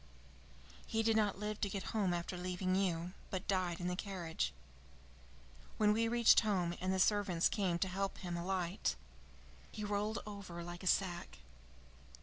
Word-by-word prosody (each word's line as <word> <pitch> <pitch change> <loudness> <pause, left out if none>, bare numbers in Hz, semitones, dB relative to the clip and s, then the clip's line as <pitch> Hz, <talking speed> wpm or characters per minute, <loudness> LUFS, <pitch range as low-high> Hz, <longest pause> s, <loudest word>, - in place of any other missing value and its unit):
"He 225 0 +1
did 225 0 +3
not 210 -3 +2
live 210 +1 -4
to 200 - +1
get 195 -1 -3
home 205 -5 +2
after 175 +1 -2
leaving 185 +1 -1
you, 180 -2 0 0.2
but 190 0 -4
died 185 -3 0
in 175 - -2
the 180 - 0
carriage. 180 - -2 1.3
When 210 -1 +5
we 230 +1 +2
reached 235 0 +6
home 185 -6 +1
and 185 +1 0
the 190 - +1
servants 190 -3 +3
came 185 -5 0
to 190 - 0
help 195 +1 -2
him 175 -2 -4
alight, 180 +1 -1 0.8
he 215 - -5
rolled 210 +1 -1
over 200 -5 -7
like 175 0 -7
a 190 - -5
sack. 175 - 0
190 Hz, 160 wpm, -36 LUFS, 175-205 Hz, 1.3 s, reached